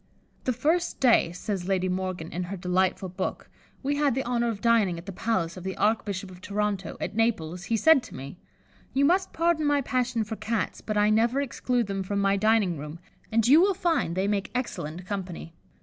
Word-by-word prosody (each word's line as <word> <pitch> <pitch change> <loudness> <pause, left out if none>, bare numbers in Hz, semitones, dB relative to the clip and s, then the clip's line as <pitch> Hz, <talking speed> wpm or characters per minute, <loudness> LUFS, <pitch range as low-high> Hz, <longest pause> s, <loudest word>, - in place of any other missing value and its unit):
"The 255 - +2
first 320 +8 0
day," 235 -9 +4
says 180 0 -4
Lady 185 -1 +1
Morgan, 185 -3 -3
in 180 +1 -3
her 195 +3 -5
delightful 185 +1 0
book, 185 +1 -4 0.3
"we 285 +1 0
had 285 -4 +2
the 265 - -1
honour 235 -1 +1
of 215 -3 -3
dining 220 -6 +3
at 170 - -9
the 200 - -5
palace 185 -4 -1
of 180 - -8
the 190 0 -4
Archbishop 205 -3 0
of 180 0 -13
Toronto, 200 -2 -2
at - - -3
Naples, 180 -7 0
he 230 - +1
said 320 +4 +6
to - - -11
me, 140 +6 -8 0.6
'You 275 +1 +4
must 370 +5 +2
pardon 335 -1 +1
my 290 -1 +3
passion 250 -3 0
for 215 +1 -5
Cats, 215 0 -2
but 215 -1 -3
I 210 +1 +4
never 230 +5 +3
exclude 250 -3 0
them 195 -1 -3
from 200 +2 -3
my 200 0 +3
dining 205 -5 +2
room, 150 +2 -7 0.3
and 225 0 +3
you 295 +6 +7
will 390 +1 +3
find 330 - 0
they 190 +2 0
make 205 -1 -1
excellent 175 - -4
company. 185 -4 -5
210 Hz, 205 wpm, -27 LUFS, 185-245 Hz, 0.6 s, you